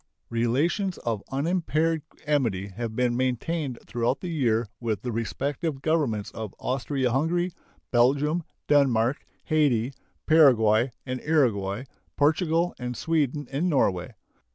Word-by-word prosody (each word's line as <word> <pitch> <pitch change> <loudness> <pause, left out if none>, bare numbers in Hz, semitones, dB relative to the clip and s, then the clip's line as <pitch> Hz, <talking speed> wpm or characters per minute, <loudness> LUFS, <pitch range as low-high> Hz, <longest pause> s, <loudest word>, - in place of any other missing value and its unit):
Relations 145 - +1
of 115 -4 -2
unimpaired 160 +2 0 0.2
amity 115 -10 0
have 110 +3 -5
been 125 -1 +1
maintained 130 +2 -1
throughout 120 +2 -1
the 180 - -5
year 120 -7 +1
with 110 -5 -2
the 125 - -2
respective 140 +6 -2
Governments 140 -11 0
of 110 -3 -7
Austria 130 0 -1
Hungary, 170 +7 +1 0.4
Belgium, 140 +7 +3 0.3
Denmark, 135 -2 +3 0.2
Hayti, 140 -6 +2 0.3
Paraguay 125 -7 +5 0.2
and 130 -1 -3
Uruguay, 115 -9 +1 0.3
Portugal, 165 +3 +2
and 125 -1 -4
Sweden 150 -3 0
and 155 +7 0
Norway. 95 - +1
135 Hz, 115 wpm, -26 LUFS, 115-155 Hz, 0.4 s, Paraguay